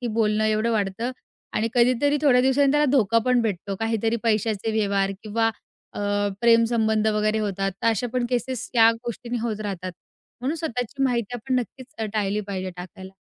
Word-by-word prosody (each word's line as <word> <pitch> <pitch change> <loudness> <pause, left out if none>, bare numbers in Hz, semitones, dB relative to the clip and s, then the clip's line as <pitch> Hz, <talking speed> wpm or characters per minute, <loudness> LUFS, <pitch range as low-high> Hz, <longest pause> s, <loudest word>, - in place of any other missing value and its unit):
की 245 - -3
बोलणं 215 -1 +2
एवढं 215 +2 +1
वाढतं 215 +3 -1 0.4
आणि 225 +1 +1
कधीतरी 255 +4 +3
थोड्या 250 -4 +5
दिवसांनी 270 +2 +3
त्याला 295 0 +3
धोका 230 -4 +3
पण 250 -1 +3
भेटतो, 200 -2 -2
काहीतरी 225 0 0
पैशाचे 220 -1 0
व्यवहार 200 -2 +1
किंवा 225 +1 +1 0.4
अ, - - -5 0.4
प्रेम 230 -1 +5
संबंध 220 -2 +1
वगैरे 215 +1 +1
होतात, 195 -2 -1
तर - - +1
अशा 230 +1 +2
पण 250 -1 0
केसेस 250 0 -2
या 225 -1 +7
गोष्टींनी 235 +1 -5
होत 220 -2 -3
राहतात. 185 -3 -4 0.5
म्हणून 280 +6 -1
स्वतःची 270 -3 -3
माहिती 240 -2 -1
आपण 255 +2 -3
नक्कीच 250 +1 -6
अ, 220 - -1
टाळली 210 -1 0
पाहिजे 190 -1 -3
टाकायला. 190 +1 -9
225 Hz, 170 wpm, -24 LUFS, 210-245 Hz, 0.5 s, या